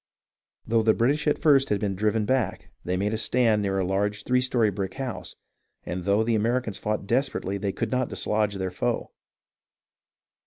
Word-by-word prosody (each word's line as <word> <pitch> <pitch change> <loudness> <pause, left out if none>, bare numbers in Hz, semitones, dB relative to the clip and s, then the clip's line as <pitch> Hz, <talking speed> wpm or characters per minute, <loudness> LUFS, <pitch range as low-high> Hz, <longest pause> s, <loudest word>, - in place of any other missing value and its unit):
Though 115 0 +2
the 110 0 +3
British 145 +6 +1
at 150 - +3
first 140 -4 +4
had 105 - +1
been 100 -1 -1
driven 105 +2 +1
back, 125 -3 -1
they 90 +1 -1
made 105 +3 0
a 110 - -1
stand 115 -2 +2
near 95 -1 -1
a 95 - +1
large 100 +2 -1
three 125 0 +2
story 120 -4 +2
brick 95 -1 -4
house, 130 -3 -5 0.5
and 90 0 -4
though 100 +2 +3
the 115 +1 0
Americans 115 0 0
fought 105 -1 -2
desperately, 105 -4 -1
they 100 -1 -1
could 110 +2 -3
not 125 -1 0
dislodge 105 -1 0
their 95 -1 -3
foe. - - -2
110 Hz, 185 wpm, -26 LUFS, 100-125 Hz, 0.5 s, first